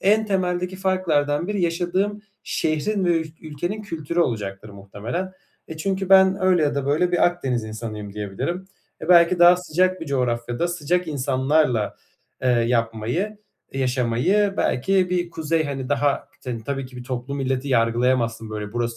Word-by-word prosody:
En 215 +3 +3
temeldeki 180 -2 -1
farklardan 170 -4 0
biri 205 -3 -1
yaşadığım 185 +5 0 0.2
şehrin 185 +6 -1
ve 175 - +3
ül 160 - -4
ülkenin 175 +7 -4
kültürü 170 -3 -2
olacaktır 105 -7 -2
muhtemelen. 105 - -5 0.4
E, 160 - -7
çünkü 190 +3 -2
ben 190 0 +6
öyle 180 -3 +4
ya 145 -1 +1
da 140 -1 -2
böyle 175 +5 +2
bir 175 - +4
Akdeniz 135 -10 -1
insanıyım 110 -2 -6
diyebilirim. 105 - -4 0.3
E, - - -7
belki 175 0 +6
daha 175 +1 +8
sıcak 185 +1 0
bir 165 - -6
coğrafyada, 120 +2 -1
sıcak 175 +1 -1
insanlarla, 130 -4 +1 0.5
eee, 130 - +2
yapmayı, 120 - 0 0.3
yaşamayı, 130 - +1
belki 185 +7 +1
bir 175 -1 0
kuzey, 160 0 0
hani, 135 -3 -4
daha 145 0 0 0.2
k 125 -2 -3
tabii 135 -2 -3
ki 130 - -13
bir 125 - -8
toplu 130 +2 -4
milleti 135 0 -2
yargılayamazsın, 115 -1 +1
burası 115 +2 -3
150 Hz, 150 wpm, -23 LUFS, 120-180 Hz, 0.5 s, daha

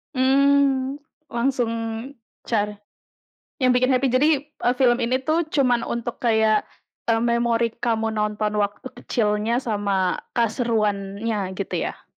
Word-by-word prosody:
Mmm, 275 0 +3 0.3
langsung 240 0 0 0.8
cara 210 -2 0 0.9
yang 255 -1 +4
bikin 255 +1 +3
happy 260 +1 +2
jadi, 265 +4 +3 0.2
eee, 290 -4 -1
film 245 -1 +4
ini 250 +2 +1
tuh 315 +2 +1
cuman 255 -6 +2
untuk 235 0 -4
kayak, 220 -2 +3 0.4
eee, 225 -1 +3
memori 235 -1 +1
kamu 225 -1 0
nonton 210 0 -1
waktu 205 +5 -2
kecilnya 215 +1 0
sama 200 -4 0 0.2
keseruannya 215 -4 -1
gitu 200 - -4
ya? - - -9
235 Hz, 120 wpm, -23 LUFS, 210-255 Hz, 0.9 s, yang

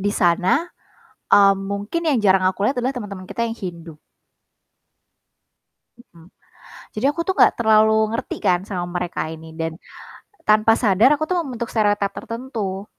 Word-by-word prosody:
di 205 - 0
sana, 185 - +2 0.7
mmm, 195 -1 +6
mungkin 200 +12 -4
yang 270 - +2
jarang 190 -2 +3
aku 195 +2 -3
lihat 275 - 0
adalah 255 - 0
teman-teman 205 -7 -7
kita 235 - -2
yang 225 - -4
Hindu. 170 -6 -8 2.0
Mhm. 170 -8 -19 0.7
Jadi 220 +5 -2
aku 335 +3 -2
tuh 380 - +1
gak - - +3
terlalu 220 -1 +4 0.2
ngerti 230 - -4
kan 180 -1 +3
sama 180 -3 -3
mereka 175 0 -3
ini 160 0 -12
dan 165 0 -2 0.8
tanpa 215 +1 +5
sadar 215 +3 +4
aku 310 - -2
tuh 365 - 0
membentuk 245 -6 -5
stereotype 205 -2 +1
tertentu. 225 -5 -5
205 Hz, 150 wpm, -21 LUFS, 185-235 Hz, 2.0 s, mmm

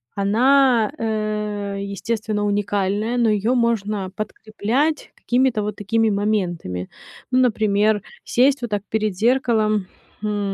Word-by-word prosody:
она, 240 +3 +3
э, 210 -2 -2
естественно, 210 +1 -2
уникальная, 205 +2 0
но 235 -2 +3
её 215 +4 +1
можно 210 -5 0
подкреплять 220 +8 -2
какими-то 245 -3 +1
вот 210 -1 -3
такими 220 +2 +1
моментами. 180 - -1 0.4
Ну, 255 - +3
например, 215 -3 +2 0.2
сесть 265 +3 +2
вот 240 - -3
так 205 -1 -1
перед 215 -3 -1
зеркалом, 220 -3 +2 0.4
хм, 205 -2 -1
215 Hz, 115 wpm, -21 LUFS, 205-235 Hz, 0.4 s, она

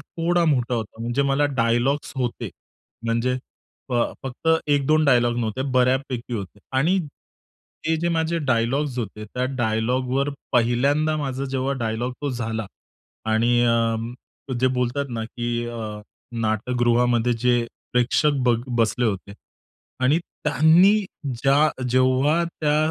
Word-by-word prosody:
थोडा 170 +3 0
मोठा 125 -1 -1
होता. 110 -1 -5
म्हणजे 120 +4 0
मला 145 +1 +3
डायलॉग्स 120 +5 +1
होते. 125 -3 -2 0.5
म्हणजे 115 +2 0 0.5
फ - - -1 0.3
फक्त 135 +4 -4 0.2
1-2 145 +2 +3
डायलॉग 120 -4 +3
नव्हते, 115 +2 -2
बऱ्यापैकी 130 -1 +1
होते 100 -2 -6 0.2
आणि 165 +8 +3 0.9
हे 160 0 +2
जे 170 - +1
माझे 165 +1 0
डायलॉग्स 130 0 0
होते, 105 -2 -5
त्या 125 +4 -3
डायलॉगवर 125 +4 0 0.2
पहिल्यांदा 140 +6 +2
माझा 135 -2 -3
जेव्हा 135 0 -1
डायलॉग 115 +2 -2
तो 145 - -1
झाला 110 -3 -3 0.7
आणि 120 +2 +3
अ, 115 +3 -2
जे 130 - +4
बोलतात 125 +3 0
ना, 115 -1 -3
की 120 0 -3
अ, 110 -3 -5 0.4
नाटकगृहामध्ये 120 +2 +2
जे 125 0 +3 0.4
प्रेक्षक 125 +5 +3
ब 120 - +5 0.2
बसले 115 +1 +1
होते 100 -2 -2 0.7
आणि 145 +5 +4 0.3
त्यांनी 160 +6 +5 0.5
ज्या 140 0 +3
जेव्हा 130 +6 +3
त्या 155 -3 -1
125 Hz, 125 wpm, -23 LUFS, 115-140 Hz, 0.9 s, ब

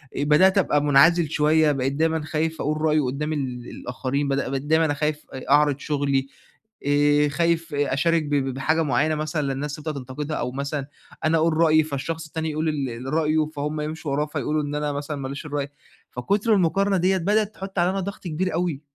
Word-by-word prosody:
أ 145 - -1
بدأت 185 +7 +4
أبقى 150 -6 +2
منعزل 155 +3 +5
شوية 155 0 +3
بقيت 135 -1 -1
دايمًا 160 +2 +1
خايف 160 0 -2
اقول 155 +1 -1
رأيي 155 -1 +3
قدّام 145 +3 -2
ال 125 -4 -4
الآخرين 135 +3 -3
بدأ 140 -1 -1
بقيت 135 0 -2
دايمًا 160 0 +2
اخايف 150 +1 -2
أ 130 - -8
أعرض 145 -1 +4
شُغلي 140 -2 0 0.6
آآ 145 0 +3
خايف 165 0 0
أشارك 145 +3 +1
ب 145 0 -1
ب 135 -2 0
بحاجة 155 +5 +1
معيّنة 150 +2 +1
مثلًا 155 0 -2
للناس 145 +2 -4
تبدأ 155 0 -5
تنتقدها 140 +3 -5
أو 125 - -2
مثلًا 140 +1 -3 0.4
أنا 160 +1 +3
اقول 160 0 +2
رأيي 155 -1 +5
فالشخص 160 +3 -4
التاني 160 0 -3
يقول 155 +1 -1
ال 135 -3 -4
رأيه 155 -1 +2
فهُم 150 +1 -3
يمشوا 155 -1 -4
وراه 150 +2 +1
فيقولوا 150 0 -2
إن 145 0 -4
أنا 150 0 -1
مثلًا 145 +1 -4
ماليش 135 +1 -6
الرأي، 145 -2 -3 0.4
فكتر 200 - +1
المقارنة 195 +2 +2
دِيّة 190 +2 +2
بدأت 210 +4 +1
تحط 195 -1 -5
عليّا 175 +2 +3
أنا 195 - -2
ضغط 200 +2 -6
كبير 175 +3 -2
أوي. 165 -4 -1
150 Hz, 190 wpm, -24 LUFS, 140-160 Hz, 0.6 s, منعزل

